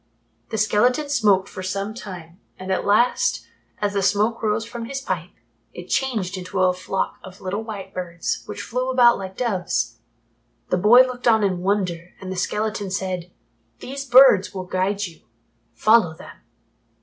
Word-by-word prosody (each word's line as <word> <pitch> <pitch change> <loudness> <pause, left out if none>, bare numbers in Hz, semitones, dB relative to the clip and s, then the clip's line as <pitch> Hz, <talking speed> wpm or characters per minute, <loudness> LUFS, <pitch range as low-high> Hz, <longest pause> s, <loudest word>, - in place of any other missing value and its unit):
The 220 - -3
skeleton 245 +7 +2
smoked 205 -9 +3
for - - -8
some 195 +3 -3
time 180 -6 -10 0.2
and 185 0 -6
at 190 - -1
last, 225 +5 +2 0.3
as 205 -1 -1
the 200 - 0
smoke 205 +4 +1
rose 220 0 0
from 235 0 -7
his 275 +3 -4
pipe, 180 - -4 0.5
it 175 +1 -9
changed 200 -8 -1
to 185 +1 -4
a 185 -1 +4
flock 185 +1 -3
of 185 0 -12
little 195 +3 -3
white 215 -3 -8
birds, 170 -2 -3
which 205 -1 -6
flew 255 +2 -2
about 245 -3 +5
like 190 -1 -7
doves. 205 -8 -1 0.7
The 180 - +3
boy 215 +7 +7
looked 255 -1 -1
on 220 -2 +5
in 185 -3 0
wonder, 180 -3 -2
and 190 -1 -7
the - - -4
skeleton 210 +2 -2
said, 185 -2 -3 0.5
"These 275 - -6
birds 245 -7 +6
will 185 -1 -4
guide 195 +3 -1
you. 170 -3 -11 0.5
Follow 215 -7 +4
them." - - -12
200 Hz, 165 wpm, -22 LUFS, 185-230 Hz, 0.7 s, boy